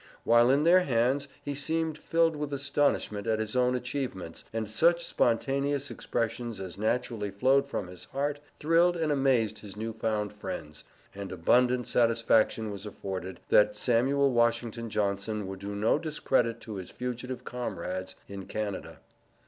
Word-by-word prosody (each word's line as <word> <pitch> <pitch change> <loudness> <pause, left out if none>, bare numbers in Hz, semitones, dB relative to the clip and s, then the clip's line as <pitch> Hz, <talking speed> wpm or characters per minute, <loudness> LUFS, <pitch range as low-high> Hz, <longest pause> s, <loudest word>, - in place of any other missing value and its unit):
While 120 +1 +5
in 140 +3 +4
their 175 +3 +7
hands 135 -2 +1 0.2
he 145 - -3
seemed 160 +2 0
filled 165 +1 +1
with 150 -1 -4
astonishment 140 -6 0
at 110 -1 +2
his 110 +1 -3
own 125 0 +3
achievements, 125 - -4
and 110 -1 -2
such 170 +10 +3
spontaneous 140 +4 +1
expressions 115 -1 -3
as 95 -2 -6
naturally 110 0 -1
flowed 130 +7 +3
from 105 - -3
his 90 0 -10
heart 145 +2 -2 0.2
thrilled 170 +3 +3
and 160 -2 0
amazed 135 -6 +2
his 105 -1 -10
new 110 +1 -3
found 110 -2 -2
friends, 75 -7 -7 0.3
and 100 -1 -7
abundant 125 +8 +3
satisfaction 115 -2 +2
was 100 +1 -6
afforded, 95 -2 -6
that 105 0 +5
Samuel 135 +5 +2
Washington 120 -1 +1
Johnson 105 0 -1
would 95 0 -6
do 100 +1 -5
no 105 +8 +2
discredit 135 -7 0
to 110 -3 -6
his 95 -2 -7
fugitive 125 0 -5
comrades 95 -6 -4
in 100 -1 -8
Canada. 105 -3 -5
115 Hz, 150 wpm, -29 LUFS, 105-140 Hz, 0.3 s, their